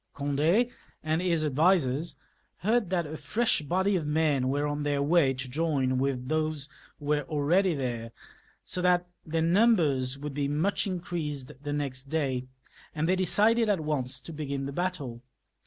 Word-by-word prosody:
Gond6 155 - +2 0.3
and 155 +2 0
his 170 -4 +1
advisers 150 -1 +2 0.4
heard 215 0 +2
that 175 -3 0
a 155 +1 -6
fresh 230 -2 +1
body 190 +7 +1
of 160 -5 -1
men 150 -4 +2
were 145 +2 0
on 145 0 -2
their 145 -1 0
way 150 -2 +4
to 135 +1 -4
join 135 -3 0
with 130 -2 -1
those 155 -1 0 0.3
who 145 - -11
were 150 0 +2
already 165 +4 +2
there, 120 -4 -3 0.5
so 180 - -2
that 180 0 +3 0.2
their 160 +1 0
numbers 165 - +3
would 145 0 -5
in 145 +1 0 0.4
crease 150 -6 -3
even 145 +3 -12
the 145 0 -3
next 135 -2 -3
day, 135 -4 -1 0.5
and 155 +1 0
they 185 +1 +2
settled 225 +4 +4
at 200 -4 +2
once 130 -4 -2
to 160 +6 -9
begin 140 -2 -3
the 140 - -4
battle. 145 -9 -3
150 Hz, 165 wpm, -28 LUFS, 140-175 Hz, 0.5 s, way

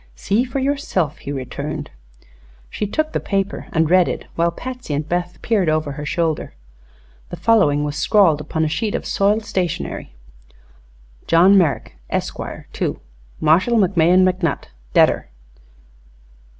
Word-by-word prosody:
"See 205 - +1
for 260 +2 -4
yourself," 265 - -1
he 140 - -6
returned. 130 -3 -5 0.8
She 210 - -2
took 310 +8 -1
the - - 0
paper 195 -1 -2
and 160 -1 +2
read 180 +1 +4
it, - - -4
while 170 +1 +1
Patsy 250 - -6
and 145 +1 -3
Beth 175 +1 -2
peered 205 -7 +2
over 155 -1 0
her 145 +1 -6
shoulder. 160 - -1 0.7
The - - -5
following 190 -11 +3
was 145 0 -3
scrawled 175 -8 +3
upon 160 +1 -1
a - - +1
sheet 210 +7 -2
of - - -3
soiled 210 +2 +1
stationery: 175 - -3 1.1
"John 180 +4 +6
Merrak, 150 - +2 0.2
esquare, - - -4
to - - -2 0.4
Marshall 185 +10 +3
McMahon 185 -2 +4
McNutt, 180 -4 -1 0.3
detter. - - +4
180 Hz, 135 wpm, -20 LUFS, 155-205 Hz, 1.1 s, John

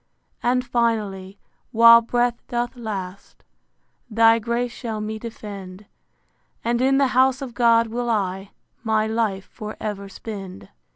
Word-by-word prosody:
And 250 +1 +1
finally, 210 -5 -1 0.3
while 230 0 +8
breath 240 +1 0
doth 240 +1 -2
last, 200 -5 -7 0.7
Thy 225 +1 +5
grace 235 +2 -2
shall 225 -3 -5
me 215 +1 -4
defend: 205 -4 -9 0.8
And 235 +1 0
in 270 +1 +3
the 275 -1 +3
house 260 +1 +3
of 265 -4 -7
God 230 -1 +4
will 240 +2 -3
I 195 -3 -1 0.3
My 220 -1 +1
life 220 -3 -1
for 215 0 -7
ever 200 -2 -5
spend. 195 - -9
225 Hz, 130 wpm, -22 LUFS, 205-240 Hz, 0.8 s, while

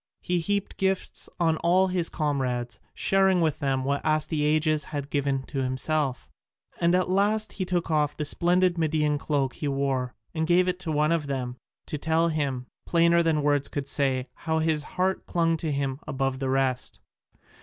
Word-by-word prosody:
He 180 0 0
heaped 200 +4 -2
gifts 190 0 -1
on 165 -2 +2
all 185 +3 +3
his 180 -2 0
comrades, 125 -7 -2 0.2
sharing 190 -1 +3
with 160 -3 +1
them 135 -2 0
what 140 +1 -1
Astyages 155 0 +1
had 145 -2 -5
given 140 -2 0
to 135 +1 -5
himself; 130 +1 -1 0.5
and 170 +1 +3
at 185 0 +2
last 205 +3 +1
he 185 - -3
took 175 -2 -1
off 150 -1 +1
the 150 - -2
splendid 175 +3 +2
Median 150 -2 +1
cloak 140 -3 0
he 150 - -4
wore 135 -2 -1 0.2
and 160 -1 -1
gave 180 +1 +4
it 180 0 -1
to 170 -4 -4
one 150 +1 +2
of 165 -3 0
them, 125 -3 -3 0.3
to 150 - -5
tell 160 +2 +2
him, 140 -5 -2 0.2
plainer 170 0 +4
than 160 -3 +1
words 145 -1 +2
could 140 -2 -4
say, 130 -3 0
how 160 -1 -2
his 160 -1 +2 0.2
heart 190 +1 0
clung 165 -2 +1
to 160 -1 -3
him 140 -1 -2
above 135 -1 -1
the 135 -1 -2
rest. 130 -1 0
155 Hz, 175 wpm, -26 LUFS, 140-170 Hz, 0.5 s, gave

